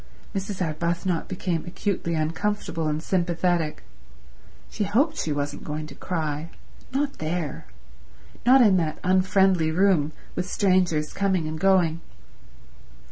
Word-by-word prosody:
Mrs. 195 Hz, -1 st, -2 dB
Arbuthnot 170 Hz, +2 st, -1 dB
became 180 Hz, -3 st, -2 dB
acutely 175 Hz, -2 st, -2 dB
uncomfortable 165 Hz, +1 st, -1 dB
and 155 Hz, +1 st, -1 dB
sympathetic. 175 Hz, -, 0 dB, 0.8 s
She 215 Hz, -, -3 dB
hoped 265 Hz, -, +2 dB
she 160 Hz, -, -2 dB
wasn't 145 Hz, 0 st, -3 dB
going 150 Hz, 0 st, -4 dB
to 150 Hz, -, -10 dB
cry. 155 Hz, -1 st, -3 dB, 0.4 s
Not 280 Hz, +1 st, -1 dB
there. 155 Hz, -, -3 dB, 0.8 s
Not 255 Hz, +2 st, +7 dB
in 205 Hz, -5 st, +6 dB
that 160 Hz, -3 st, -1 dB
unfriendly 185 Hz, -2 st, +3 dB
room, 165 Hz, -3 st, +3 dB, 0.2 s
with 180 Hz, +1 st, -3 dB
strangers 180 Hz, -7 st, +2 dB
coming 190 Hz, -5 st, 0 dB
and 155 Hz, 0 st, -4 dB
going. 175 Hz, -3 st, +3 dB
175 Hz, 120 wpm, -25 LUFS, 155-195 Hz, 0.8 s, Not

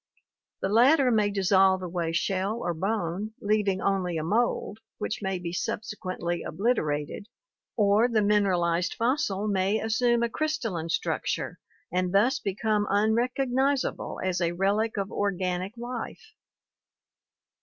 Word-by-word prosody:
The 190 Hz, -, +1 dB
latter 255 Hz, +5 st, +5 dB
may 210 Hz, -2 st, +3 dB
dissolve 190 Hz, -1 st, +3 dB
away 170 Hz, -2 st, -2 dB
shell 190 Hz, +5 st, 0 dB
or 175 Hz, -7 st, -2 dB
bone, 195 Hz, +3 st, -2 dB
leav 210 Hz, 0 st, +1 dB
ing 190 Hz, -1 st, 0 dB
only 185 Hz, -4 st, 0 dB
a 155 Hz, -, -2 dB
mould 215 Hz, +2 st, 0 dB, 0.2 s
which 215 Hz, -, -3 dB
may 190 Hz, -1 st, -1 dB
be 175 Hz, -1 st, -5 dB
subsequently 185 Hz, -4 st, -3 dB
obliterated, 160 Hz, -4 st, -1 dB, 0.5 s
or 210 Hz, +2 st, +4 dB
the 225 Hz, -3 st, +1 dB
mineralized 180 Hz, -4 st, +2 dB
fossil 230 Hz, -5 st, 0 dB
may 200 Hz, +1 st, +1 dB
assume 235 Hz, +2 st, +1 dB
a 235 Hz, -, +1 dB
crystalline 230 Hz, -, -2 dB
structure -, -, -2 dB, 0.3 s
and 180 Hz, +1 st, 0 dB
thus 240 Hz, +7 st, +3 dB
become 210 Hz, +1 st, 0 dB
unrecognizable 250 Hz, +6 st, 0 dB
as 185 Hz, -1 st, -1 dB
a 170 Hz, 0 st, +1 dB
relic 205 Hz, +5 st, 0 dB
of 195 Hz, 0 st, -2 dB
organic 185 Hz, +1 st, -2 dB
life. 245 Hz, -, -7 dB
200 Hz, 125 wpm, -27 LUFS, 185-225 Hz, 0.5 s, latter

